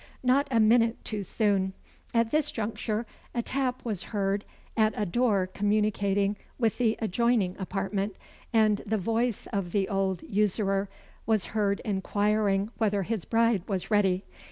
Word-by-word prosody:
Not 265 +3 +3
a 235 -4 +2
minute 230 +1 +3
too 210 -2 -2
soon. 195 -1 +1 0.4
At 230 -1 +2
this 305 -1 +2
juncture 220 0 -2 0.3
a 235 - 0
tap 255 -1 -2
was 210 -6 -2
heard 200 -1 -1 0.3
at 220 -1 +3
a 210 - 0
door 205 -1 +2
communicating 205 -1 +1 0.2
with 225 -3 0
the 225 -3 +2
adjoining 220 -3 +1
apartment, 195 +1 -2 0.4
and 215 -3 +3
the 220 +1 +1
voice 225 +3 0
of 195 -4 -2
the 195 -2 +2
old 195 -2 -1
usurer 195 -1 +1 0.4
was 220 -4 +2
heard 205 -2 +1
inquiring 205 0 +1
whether 205 -3 +1
his 220 -1 -3
bride 230 -3 +2
was 195 0 -3
ready. 195 -3 +2
210 Hz, 145 wpm, -28 LUFS, 195-230 Hz, 0.4 s, Not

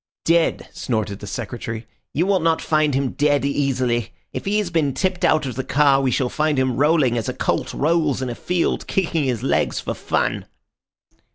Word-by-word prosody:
"Dead!" 165 0 +2
snorted 110 -4 -2
the 105 - -8
Secretary. 115 +1 -5 0.3
"You 165 +5 +1
will 195 -1 +2
not 165 -1 +2
find 155 -3 +1
him 135 -1 0
dead 145 -1 +1
easily. 130 -5 0 0.2
If - - -5
he 205 +2 +1
has 205 -4 -1
been 150 -5 +1
tipped 185 -1 -1
out 155 -2 +3
of 130 - -3
the 130 +3 -3
car, 140 -1 +3
we 135 - +1
shall 125 +1 +1
find 150 +2 0
him 130 -2 +1
rolling 145 -5 +3
as 110 - -3
a - - -4
colt - - -1
rolls 155 -2 +1
in 130 - -2
a 120 - -3
field, 175 +7 -1
kicking 165 -5 0
his 125 -4 -1
legs - - +1
for - - -3
fun." - - -1
140 Hz, 195 wpm, -21 LUFS, 125-160 Hz, 0.3 s, out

